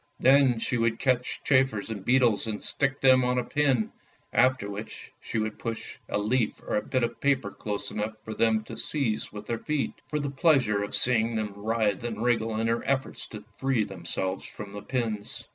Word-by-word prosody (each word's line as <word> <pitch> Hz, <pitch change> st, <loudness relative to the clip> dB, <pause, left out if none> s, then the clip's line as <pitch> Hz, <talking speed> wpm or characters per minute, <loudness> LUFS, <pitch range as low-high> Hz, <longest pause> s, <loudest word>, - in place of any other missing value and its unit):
Then 135 Hz, -2 st, +5 dB
she 120 Hz, +2 st, -1 dB
would 115 Hz, 0 st, +1 dB
catch 125 Hz, -1 st, 0 dB
chafers 130 Hz, -6 st, +2 dB
and 100 Hz, -4 st, -5 dB
beetles 120 Hz, -3 st, +3 dB
and 105 Hz, -2 st, -4 dB
stick 140 Hz, 0 st, -1 dB
them 130 Hz, -1 st, +6 dB
on 125 Hz, 0 st, +1 dB
a 125 Hz, -, +1 dB
pin, 135 Hz, -4 st, +1 dB, 0.4 s
after 130 Hz, -5 st, +3 dB
which 100 Hz, +2 st, -7 dB
she -, -, -4 dB
would 110 Hz, -1 st, -2 dB
push 115 Hz, -1 st, -5 dB
a -, -, 0 dB
leaf 110 Hz, +2 st, 0 dB
or -, -, -2 dB
a 105 Hz, -, +2 dB
bit 130 Hz, -2 st, -1 dB
of 120 Hz, 0 st, -3 dB
paper 135 Hz, -8 st, +1 dB
close 100 Hz, -1 st, -4 dB
enough 105 Hz, +1 st, -3 dB
for 110 Hz, -, -6 dB
them 110 Hz, 0 st, +2 dB
to -, -, -8 dB
seize 130 Hz, -8 st, -1 dB
with 105 Hz, -1 st, -8 dB
their 115 Hz, -1 st, -2 dB
feet; 150 Hz, -2 st, -1 dB
for 150 Hz, -, -2 dB
the 145 Hz, -2 st, -2 dB
pleasure 130 Hz, -8 st, +3 dB
of 100 Hz, -, -1 dB
seeing 115 Hz, -2 st, +3 dB
them 105 Hz, -2 st, -2 dB
writhe 110 Hz, -1 st, 0 dB
and 115 Hz, -2 st, -3 dB
wriggle 115 Hz, -2 st, +1 dB
in 115 Hz, -, 0 dB
their 115 Hz, +1 st, 0 dB
efforts 135 Hz, -1 st, -1 dB
to 105 Hz, -1 st, -9 dB
free 135 Hz, -5 st, +2 dB
themselves 95 Hz, 0 st, -3 dB
from 100 Hz, -2 st, -9 dB
the 105 Hz, -, -6 dB
pins. 110 Hz, -4 st, -3 dB
115 Hz, 200 wpm, -27 LUFS, 105-130 Hz, 0.4 s, them